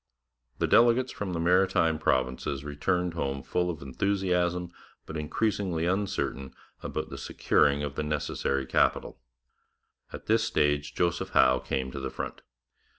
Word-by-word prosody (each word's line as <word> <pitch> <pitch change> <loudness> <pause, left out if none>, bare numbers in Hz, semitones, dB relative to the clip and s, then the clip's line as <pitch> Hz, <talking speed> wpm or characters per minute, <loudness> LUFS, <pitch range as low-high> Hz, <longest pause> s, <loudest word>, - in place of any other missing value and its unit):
The - - +1
delegates 120 +2 +4
from 95 -3 -4
the 85 - -2
Maritime 90 -2 +3
Provinces 65 -1 0
returned 90 +5 -1
home 70 -4 -3
full 90 0 -1
of 80 -5 -5
enthusiasm, 90 +2 0 0.3
but 80 - -8
increasingly 85 +1 -1
uncertain 95 -8 -2 0.3
about - - -4
the - - -6
securing 70 0 +2
of 70 -1 -3
the 70 - -3
necessary 75 -2 -1
capital. - - +1 0.9
At - - -9
this - - +3
stage 75 0 0
Joseph 85 -1 0
Howe 65 0 +5
came 65 0 -3
to 70 - -6
the 65 0 -3
front. - - -6
80 Hz, 140 wpm, -28 LUFS, 70-90 Hz, 0.9 s, Howe